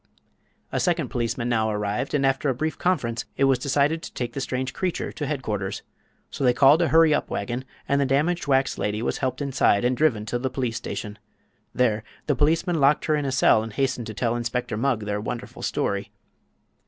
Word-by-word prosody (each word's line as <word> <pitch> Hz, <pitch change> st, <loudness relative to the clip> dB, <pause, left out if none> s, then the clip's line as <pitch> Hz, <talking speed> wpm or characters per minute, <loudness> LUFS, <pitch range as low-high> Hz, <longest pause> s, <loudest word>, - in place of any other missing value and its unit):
A -, -, 0 dB
second 170 Hz, -6 st, 0 dB
policeman 120 Hz, 0 st, -2 dB
now 110 Hz, -2 st, +1 dB
arrived, 105 Hz, +4 st, -2 dB
and 140 Hz, -1 st, +2 dB
after 135 Hz, +1 st, +1 dB
a 130 Hz, -, 0 dB
brief 155 Hz, +5 st, -2 dB
conference 125 Hz, -11 st, 0 dB
it 140 Hz, -, +2 dB
was 135 Hz, -2 st, +4 dB
decided 145 Hz, +4 st, +1 dB
to -, -, -8 dB
take 120 Hz, -1 st, -3 dB
the 135 Hz, -, -3 dB
strange 130 Hz, 0 st, -2 dB
creature 185 Hz, -2 st, -2 dB
to 145 Hz, -, -4 dB
headquarters. 105 Hz, -9 st, -3 dB, 0.5 s
So -, -, -4 dB
they 125 Hz, -1 st, +4 dB
called 140 Hz, +5 st, +6 dB
a 170 Hz, -, +3 dB
hurry 160 Hz, -1 st, +5 dB
up -, -, -1 dB
wagon, 125 Hz, +1 st, -3 dB, 0.2 s
and 140 Hz, 0 st, +2 dB
the 140 Hz, -, +1 dB
damaged 150 Hz, +6 st, +1 dB
wax 135 Hz, -1 st, +2 dB
lady 105 Hz, +2 st, -1 dB
was -, -, -1 dB
helped 130 Hz, +1 st, -2 dB
inside 125 Hz, -5 st, +2 dB
and 125 Hz, +1 st, +2 dB
driven 125 Hz, -8 st, +1 dB
to 120 Hz, +3 st, -2 dB
the 130 Hz, +1 st, -1 dB
police 125 Hz, -3 st, -2 dB
station. 105 Hz, -2 st, -6 dB, 0.5 s
There 110 Hz, -4 st, +1 dB, 0.2 s
the 150 Hz, -, +2 dB
policeman 160 Hz, +4 st, +2 dB
locked 140 Hz, +1 st, +3 dB
her 155 Hz, -, +2 dB
in 145 Hz, -1 st, -1 dB
a 135 Hz, -, -1 dB
cell 125 Hz, -4 st, +4 dB
and 110 Hz, -1 st, -6 dB
hastened 125 Hz, -3 st, -1 dB
to 110 Hz, -, -7 dB
tell 115 Hz, +1 st, 0 dB
Inspector 120 Hz, -1 st, -2 dB
Mugg 120 Hz, 0 st, 0 dB
their 105 Hz, 0 st, -2 dB
wonderful 120 Hz, +2 st, -6 dB
story. -, -, -2 dB
130 Hz, 205 wpm, -24 LUFS, 115-145 Hz, 0.5 s, called